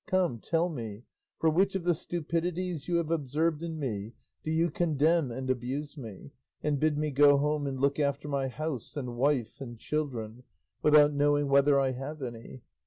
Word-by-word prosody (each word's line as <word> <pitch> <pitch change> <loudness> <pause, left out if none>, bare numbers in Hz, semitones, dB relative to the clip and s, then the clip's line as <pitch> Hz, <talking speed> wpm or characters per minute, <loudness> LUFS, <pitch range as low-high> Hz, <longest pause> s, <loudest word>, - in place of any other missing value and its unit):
Come, 180 -10 +1
tell 165 +8 +1
me, 115 - -6 0.3
for 165 - +1
which 190 +5 +2
of 190 - -1
the 175 0 +3
stupidities 170 0 -3
you 175 - 0
have 165 -1 0
observed 155 +1 0
in 165 -1 -4
me 115 -6 -4 0.3
do - - -4
you 165 +1 +2
condemn 160 -2 +2
and 130 +2 -5
abuse 130 +4 -2
me, 115 -2 -9 0.3
and 150 -2 +1
bid 155 0 +2
me 150 0 -1
go 145 +1 +6
home 150 0 0
and 135 -1 -3
look 140 +2 +1
after 140 0 0
my 140 -2 -1
house 150 -1 -5
and 125 -4 -4
wife 130 -2 0
and 120 -3 -7
children, 125 -5 -3 0.4
without 150 -1 +6
knowing 145 0 +2
whether 140 0 +5
I 135 -1 +2
have 135 +3 -6
any? 120 +1 -8
145 Hz, 180 wpm, -29 LUFS, 130-160 Hz, 0.4 s, go